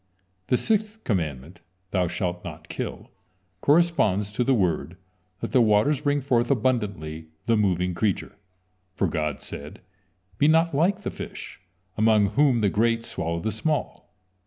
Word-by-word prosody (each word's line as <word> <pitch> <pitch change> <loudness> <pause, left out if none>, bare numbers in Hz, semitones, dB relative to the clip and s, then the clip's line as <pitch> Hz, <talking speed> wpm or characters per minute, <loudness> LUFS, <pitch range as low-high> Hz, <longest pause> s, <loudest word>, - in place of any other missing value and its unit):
The 125 - +3
sixth 220 - -1
commandment: 80 - -3 0.3
"Thou 90 -2 +1
shalt 90 0 -3
not - - -9
kill," - - -6 0.5
corresponds 140 - +3
to 115 +4 0
the 130 +2 +3
word: 85 - 0 0.5
"Let - - -3
the 125 - +5
waters 115 +6 +3
bring 145 -1 +1
forth 120 -3 +1
abundantly 100 - -1 0.2
the 115 - +3
moving 90 -4 +1
creature," 95 +3 -1 0.6
for - - +1
God 75 -4 -2
said: 75 +1 -8 0.6
"Be 145 - +5
not 165 +1 +4
like 180 +8 +2
the - - -3
fish, - - -8 0.4
among 110 -2 +4
whom 140 -5 +3
the 100 - +3
great 115 +1 +1
swallow 85 0 -3
the 110 - -1
small." 145 +7 -3
110 Hz, 145 wpm, -25 LUFS, 90-140 Hz, 0.6 s, the